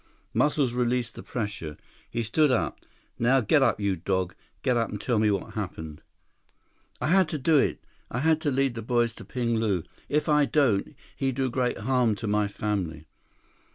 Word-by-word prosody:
Muscles 145 -4 +2
released 125 -1 0
the - - -9
pressure. 100 -10 -4 0.3
He 115 0 -2
stood 145 +7 +3
up. 125 - 0 0.4
"Now 125 +3 +4
get 135 +5 +3
up, 135 - +3
you 100 -2 +1
dog. 95 +1 -1 0.3
Get 125 -2 +2
up 115 -1 +1
and 105 - -5
tell 120 0 +1
me 110 0 +3
what 100 -2 -2
happened." 80 -7 -5 1.0
"I - - -2
had 185 +1 +4
to 155 - -2
do 150 +2 +4
it. - - +1 0.3
I - - -4
had 160 +1 +3
to 150 - +1
lead 135 -1 +1
boys 120 -2 +2
to - - -11
Ping 115 -2 -1
Lu. 100 -7 0 0.3
If 150 +2 +1
I 150 -1 +4
don't, 130 -10 +1 0.2
he 135 -1 0
do 130 0 -1
great 125 0 0
harm 125 -2 +2
to 115 - -6
my 105 0 +2
family." 95 -7 -3
120 Hz, 185 wpm, -27 LUFS, 105-135 Hz, 1.0 s, Now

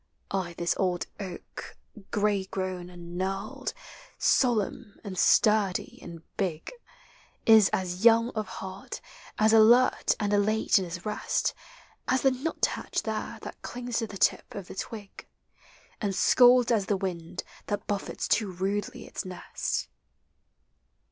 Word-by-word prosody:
Ay, 185 -3 -2
this 170 0 +1
old 180 -2 0
oak, 185 -4 -8 0.3
gray 205 -2 +1
grown 185 -2 -4
and 175 0 -8
knurled, 195 +2 -3 0.5
Solemn 230 -3 +1
and 200 -3 -6
sturdy 205 0 +3
and 170 -2 -10
big, 175 -6 -2 0.7
Is 220 -3 +7
as 185 +1 -2
young 230 +1 +6
of 215 -3 -3
heart, 190 +1 -7 0.4
as 215 +1 +4
alert 235 +3 +5
and 205 -2 0
elate 215 +1 +3
in 190 - -3
his 175 +2 -7
rest, 210 0 -1 0.5
As 260 0 +2
the 270 - +5
nuthatch 270 +6 -1
there - - -3
that - - -8
clings 245 -1 -3
to 225 - -2
the 200 - -8
tip - - +1
of 200 -2 -5
the - - -7
twig 205 0 -7 0.7
And 200 -3 -1
scolds 245 +4 +6
at 205 -4 +2
the 200 - +1
wind 175 -4 -4 0.2
that 205 -1 -2
bullets 200 -1 -3
too 210 -4 +1
rudely 205 +7 -3
its - - -5
nest. 185 -2 -3
200 Hz, 135 wpm, -28 LUFS, 185-220 Hz, 0.7 s, Is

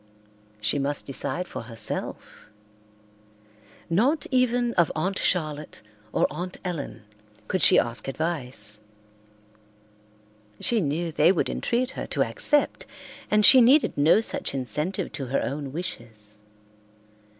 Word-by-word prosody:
She 105 +7 +1
must 140 +1 -2
decide 140 +5 -3
for - - -6
herself. 110 -1 -6 1.4
Not 250 - +1
even 245 -2 +2
of 170 -3 +2
Aunt 190 +5 -1
Charlotte 155 - -2 0.3
or - - +2
Aunt 175 +4 -6
Ellen 165 - -5 0.4
could 185 - -1
she - - +7
ask 115 -1 -1
advice. 125 -9 -2 1.8
She 230 -3 +1
knew 165 +2 -2
they 155 +3 +4
would 190 - 0
entreat 250 +2 -1
her - - -6
to - - +1
accept, 295 -1 +1 0.4
and 210 0 +4
she 260 - +9
needed 270 +6 +4
no 155 +9 +4
such 220 - -3
incentive 150 - -2
to 135 -3 -5
her 130 - 0
own 140 -1 -4
wishes. 110 -10 -7
155 Hz, 120 wpm, -25 LUFS, 135-195 Hz, 1.8 s, she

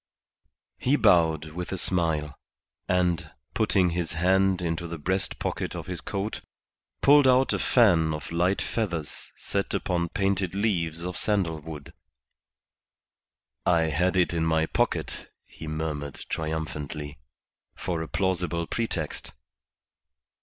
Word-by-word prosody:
He 135 +3 +3
bowed 80 - +3
with 90 +3 -5
a 95 - -2
smile, 80 -5 0 0.6
and, 90 -3 +1 0.2
putting 100 -5 +2
his 85 -1 -2
hand 95 +2 +3
into 85 0 -2
the 85 0 -5
breast 95 +5 -1
pocket - - -3
of - - -5
his 90 -1 -4
coat, 100 +2 -3 0.6
pulled 145 -1 +7
out 130 +1 +4
a - - 0
fan 85 -10 +4
of 75 0 -5
light 90 +3 +1
feathers 85 -10 -3
set - - -2
upon 85 -1 -1
painted 95 -3 0
leaves 85 -6 0
of 90 0 -3
sandal 95 -7 0
wood. 75 -2 -9 1.7
"I 80 -2 +3
had 90 +5 +1
it 90 -2 +3
in 85 -1 0
my 80 0 +2
pocket," - - -2
he 80 - -10
murmured, 75 -2 -4
triumphantly, 75 -2 -4 0.6
"for 85 -3 -3
a 80 - -4
plausible 90 -3 0
pretext." 115 +6 -3
85 Hz, 125 wpm, -27 LUFS, 80-95 Hz, 1.7 s, pulled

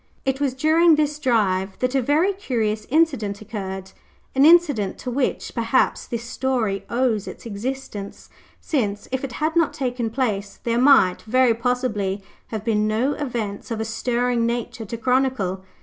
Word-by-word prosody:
It 270 +1 0
was 270 -3 0
during 315 +4 +5
this 300 0 0
drive 195 -8 +1
that 255 0 -1
a 270 - +2
very 310 +10 +2
curious 220 - -2
incident 265 -10 +1
occurred, 190 -3 -6 0.4
an 270 +2 +5
incident 300 - +4
to 250 - -5
which, 260 +1 -1
perhaps, 235 +2 +1
this 235 -1 -4
story 235 -5 -1
owes 235 -4 0
its - - -9
existence, 220 -2 -6 0.3
since, 210 - -2
if 260 +1 -2
it 265 -2 -4
had 310 +5 -1
not 330 -4 +3
taken 250 -5 -2
place, 215 -5 -2
there 235 0 +1
might, 255 -9 +5
very 250 +1 +3
possibly, 225 -5 -1 0.2
have 220 -2 -5
been 215 -2 +2
no 230 +7 +1
events 235 -9 -4
of 225 -2 -3
a 220 - -1
stirring 235 +1 0
nature 235 -1 -3
to 230 +3 -5
chronicle. 250 -7 0
240 Hz, 160 wpm, -22 LUFS, 215-270 Hz, 0.4 s, during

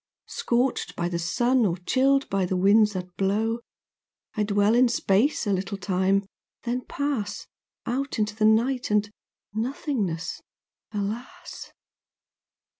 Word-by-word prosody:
Scorched 245 +2 -1
by 170 - -1
the 170 -1 -2
sun, 240 +8 +2
or 180 -4 +1
chilled 270 +9 +2
by 195 -1 0
winds 200 +4 +4
that 180 -1 -6
blow, 215 +4 +1 0.7
I 215 - -2
dwell 205 +1 +3
in 250 +2 +5
space 235 +5 +2
a 205 - +1
little 195 +2 -2
time, 195 +1 +1 0.4
then 245 +1 -1
pass 250 -8 -2 0.4
Out 265 +3 -2
into 210 -1 -1
the 215 -1 +1
night 240 +4 +2
and 210 0 +2 0.5
nothingness—alas! 215 - -5
210 Hz, 115 wpm, -26 LUFS, 195-245 Hz, 0.7 s, in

